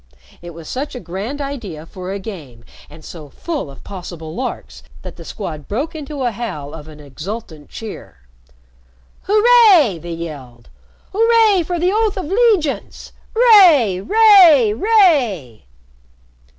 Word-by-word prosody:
It 170 -1 -11
was 165 -2 -11
such 275 +2 -5
a - - -6
grand 205 +9 -6
idea 220 - -7
for 185 +2 -8
a 200 - -4
game, 150 - -10 0.2
and 155 - -15
so 155 -4 -11
full 305 - -6
of 135 - -14
possible 175 -5 -9
larks, 255 +7 -6 0.2
that - - -9
the - - -12
Squad 155 -8 -8
broke 275 +10 -4
into 295 -3 -6
a 245 - 0
howl 185 -11 -7
of 155 -2 -10
an 155 -1 -13
exultant 155 - -9
cheer. 220 - -10 1.1
"Hooray!" 420 - +4
they 170 +1 -7
yelled. 140 - -9 0.4
"Hooray 445 -2 +3
for 345 +2 -4
the 355 +2 0
oath 435 -1 0
of 375 - -4
'legiance! 390 - -1 0.2
'Ray! 360 - +5
'ray! 370 - +5
'ray!" 250 - +1
230 Hz, 135 wpm, -17 LUFS, -, 1.1 s, Ray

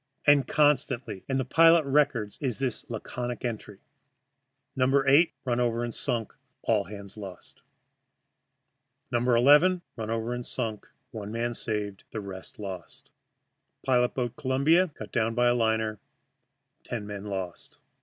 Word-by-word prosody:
And 145 -3 +5
constantly 135 -8 +1
in 135 - +1
the 130 - 0
pilot 165 +3 +6
records 135 -7 +1
is 130 -5 -1
this 135 +1 -3
laconic 120 +2 -5
entry: 110 -4 -5 1.0
"No. 135 +2 +3
8 145 +5 +5
run 120 -1 0
over 120 -1 +1
and 120 -1 -3
sunk; 115 -3 -2 0.3
all 105 -3 +2
hands 100 0 -10
lost." 95 -4 -10 1.5
"No. 120 - +2
11 145 +10 +5
run 110 -2 -5
over 115 +1 -1
and 125 0 -4
sunk; 115 -4 -4 0.2
one 105 -2 -6
man 120 +1 -1
saved, 105 -4 -4
the 110 - -5
rest 95 -2 -8
lost." 95 -5 -8 0.7
"Pilot 125 -2 +2
boat 120 -3 -2
Columbia 150 +6 +3
cut 155 - -10
down 115 0 0
by 120 0 +3
a - - +4
liner; 110 -2 0 0.8
ten 115 -4 -5
men 100 -1 -7
lost." 95 -4 -6
120 Hz, 140 wpm, -28 LUFS, 105-135 Hz, 1.5 s, pilot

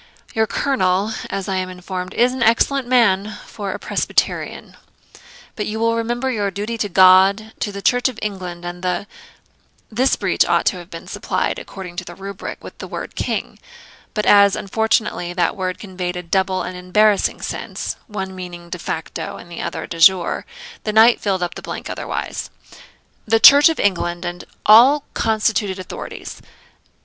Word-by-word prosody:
Your 220 0 +1
colonel, 205 -7 0 0.2
as 195 -1 -4
I 190 -1 -1
am 185 0 -2
informed, 180 0 -6
is 245 +1 +3
an 260 - -5
excellent 240 +3 +2
man 215 -5 +2
for 200 -2 -6
a - - -4
Presbyterian; - - -2 0.8
but 210 - -3
you 220 +1 -3
will 230 0 +2
remember 240 +3 -1
your 205 -4 -1
duty 205 +4 -4
to 205 - -1
God, 190 +4 +5
the 200 -1 -4
Church 245 +1 +3
of 250 - -9
England, 180 -4 -5
and 175 0 -6
the 180 +2 -1 0.4
' - - -38
(this 265 - +4
breach - - +2
ought - - +1
to 185 - +1
have 175 0 -11
been 165 - -9
supplied, - - -2
according 180 -3 -9
to - - -3
the 175 - -10
rubric, 195 +1 -7
with - - -10
the - - -7
word - - -6
KING; - - -3 0.6
but 210 - 0
as, 200 -1 +6
unfortunately, 215 -4 0
that 175 -1 0
word 185 -1 -3
conveyed 185 -3 -5
a 180 - -5
double 190 +2 0
and 180 +1 -6
embarrassing 200 +3 +2
sense, - - -5
one 190 -4 -5
meaning 175 -2 -9
de 180 - -4
facto 160 0 -5
and 175 - -13
the 170 - -6
other - - -4
de 165 - -7
jure, 180 - +4 0.4
the 215 - -1
knight 225 +2 +6
filled 190 -3 0
up 175 - -3
the - - -8
blank - - -6
otherwise) - - -4 0.8
'the 225 +1 +3
Church 285 +7 +9
of 325 - -2
England, 175 -2 0
and 175 0 -5 0.2
all 255 +7 +7
constituted 215 -3 0
authorities.' 185 - -8
195 Hz, 175 wpm, -20 LUFS, 180-220 Hz, 0.8 s, Church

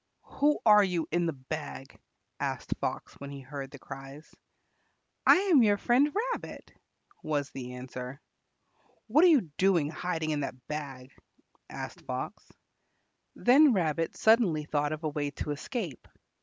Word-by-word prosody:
"Who 295 +1 +4
are 210 -2 +8
you 180 -4 -1
in 175 +1 +1
the 165 - -1
bag?" 135 0 -7 0.4
asked - - -2
Fox - - -3
when 140 - -7
he 140 -1 -8
heard 135 0 -7
the 140 - -11
cries. 135 +3 -10 0.9
"I - - +9
am 365 -7 +4
your 205 -3 +4
friend 255 +8 +3 0.2
Rabbit," - - -8 0.5
was 145 -2 -2
the 125 -2 -7
answer. 125 +1 -7 0.9
"What 285 +9 +4
are - - +8
you 310 -7 +6 0.2
doing, 175 -6 +3
hiding 160 -1 -2
in 150 - 0
the 140 - -3
bag?" 135 -4 -6 0.6
asked - - -7
Fox. - - -6 0.8
Then 270 +3 +6
Rabbit 165 -4 0
suddenly 210 -10 +3
thought 145 0 0
of 155 +1 -5
a 155 - 0
way 145 -1 -2
of 145 - -6
escape. 160 - -5
155 Hz, 145 wpm, -29 LUFS, 140-210 Hz, 0.9 s, I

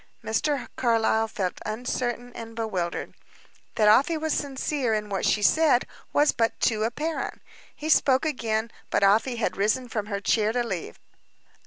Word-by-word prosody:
Mr. 245 +5 -1
Carlyle 225 -2 +2
felt 190 -4 -3
uncertain 245 +2 -3
and 225 0 -9
bewildered. 190 -7 -3 0.6
That 215 - +3
Afy 275 +10 +5
was 315 0 -1
sincere 275 -3 -1
in 210 -1 -3
what 195 -1 -1
she 210 - +2
said, 300 -1 +4 0.3
was 295 +1 +4
but 230 -1 0
too 215 -2 +1
apparent. 300 +8 -3 0.4
He 305 - -6
spoke 275 -3 +4
again 230 -6 -1 0.2
but - - +1
Afy 220 +6 +3
had 215 -6 -1
risen 215 +6 +1
from 215 -2 -3
her 200 -2 -2
chair 215 +1 +2
to 245 0 +1
leave. 190 -8 -5
230 Hz, 155 wpm, -26 LUFS, 215-260 Hz, 0.6 s, Afy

